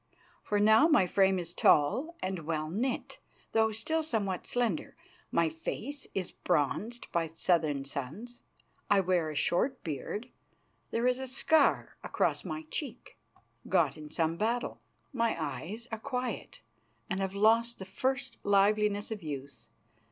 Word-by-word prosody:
For 205 - 0
now 220 +8 +6
my 300 - +5
frame 190 +1 +3
is 175 -1 -4
tall 255 - +3
and 185 -1 -2
well 155 -1 -1
knit, 240 +7 -2 0.3
though 220 0 +3
still 270 +10 0
somewhat 210 - -2
slender; 235 -9 -1 0.4
my 170 - +3
face 230 - -4
is 190 -2 -2
bronzed 215 - -1
by 170 -2 +1
southern 155 -3 +1
suns; 150 - -6 0.5
I 205 -1 +5
wear 180 -4 +1
a 155 - -6
short 250 - +1
beard; 180 - -4 0.6
there 230 +1 0
is 250 0 +2
a 265 - -4
scar 290 +5 +2
across - - 0
my 320 - -5
cheek, 255 -6 -5 0.5
got - - +3
in 155 -1 -9
some 165 +1 0
battle; 230 +4 -1 0.3
my 230 -7 +1
eyes 210 +8 -5
are 225 - -3
quiet, 250 0 -4 0.5
and 190 -4 -2
have 195 0 -2
lost 230 +3 +4
the 190 - -7
first 255 +5 -2
liveliness 205 +1 +3
of 215 -2 -4
youth. 140 -3 -7
205 Hz, 145 wpm, -31 LUFS, 170-240 Hz, 0.6 s, now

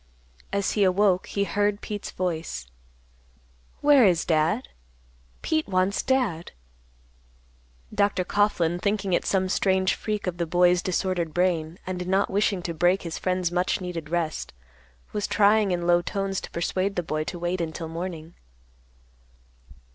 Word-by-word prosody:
As 200 0 0
he 210 - +2
awoke, 190 0 +3
he 200 - -1
heard 205 0 0
Pete's 205 -1 -5
voice, 165 - -3 1.2
"Where 290 -3 +6
is 175 -5 +3
Dad? 165 +9 +1 0.7
Pete 315 -1 0
wants 185 +1 +1
Dad." 225 -11 0 1.4
Dr. 200 -2 +1
Coughlan, 175 -4 +1
thinking 200 -1 -1
it - - +1
some 190 -1 +1
strange 190 0 +2
freak 210 -1 -3
of 180 -2 -3
the 170 -1 -1
boy's 175 +1 +4
disordered 185 -3 -1
brain, 175 -2 0
and 180 -1 -4
not 195 +2 +1
wishing 195 -2 +1
to 170 - -3
break 175 +4 +2
his 165 -2 -5
friend's 180 -2 0
much 180 +1 0
needed 175 -4 -5
rest, 165 -2 -2 0.6
was 210 - -1
trying 210 0 +4
in 175 -1 -1
low 175 0 +4
tones 195 +1 -2
to - - -8
persuade 185 +3 -1
the 175 - -1
boy 155 -1 -2
to 175 - -5
wait 175 +1 -2
until 165 0 -4
morning. 165 0 -6
185 Hz, 145 wpm, -25 LUFS, 170-200 Hz, 1.4 s, Where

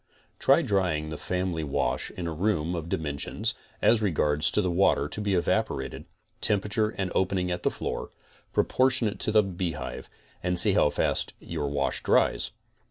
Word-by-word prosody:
Try, - - +4
drying 85 -6 0
the 80 - -4
family. 90 -3 -2
wash 70 - -1
in 90 - -6
a 85 - -2
room 85 -1 0
of 85 -1 -4
dimensions, 75 -4 -2 0.3
as 115 -1 +5
regards 75 -6 +2
water 90 -6 +3
to 105 - -5
be 100 -2 +1
evaporated, 65 -6 -1 0.4
temperature 105 +1 +1
and 95 -4 -3
opening 95 -1 0
at 90 0 -2
the - - +2
floor, - - -4 0.4
proportionate 130 -5 +2
to - - +1
the 110 0 +5
beehive, 90 -3 -4 0.3
and 90 0 0
see 85 - +6
how - - +4
fast - - 0
your 70 - -4
wash 70 -1 -1
dries. - - +2
90 Hz, 155 wpm, -27 LUFS, 80-100 Hz, 0.4 s, see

